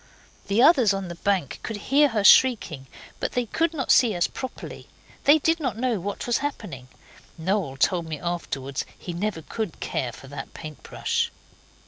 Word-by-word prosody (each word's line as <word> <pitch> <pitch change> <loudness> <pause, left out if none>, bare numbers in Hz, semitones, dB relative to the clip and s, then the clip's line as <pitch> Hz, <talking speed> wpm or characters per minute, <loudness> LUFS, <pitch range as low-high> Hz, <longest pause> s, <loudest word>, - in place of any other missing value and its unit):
The 205 +5 +3
others 255 - +6
on 195 -2 -4
the - - -5
bank 195 -8 0
could 225 - -5
hear 280 +8 +3
her 220 -6 -1
shrieking, 200 - +5 0.3
but - - -2
they 245 -1 0
could 325 +8 0
not 290 -5 -1
see 235 -6 +5
us 175 - +2
properly; 260 -1 -7 0.4
they 290 +2 +7
did 325 +2 +1
not 255 -9 -2
know 240 -3 0
what 200 +3 -4
was 240 -1 +1
happening. 200 - -5 0.5
Noel 170 -5 -1
told 170 +3 +1
me 155 -2 -5
afterwards 140 -5 -3
he 175 - -7
never 175 -2 -3
could 215 -3 -5
care 125 - -2
for 125 +4 -13
that 135 0 -8
paint 155 -2 -9
brush. - - -1
200 Hz, 175 wpm, -25 LUFS, 160-250 Hz, 0.5 s, they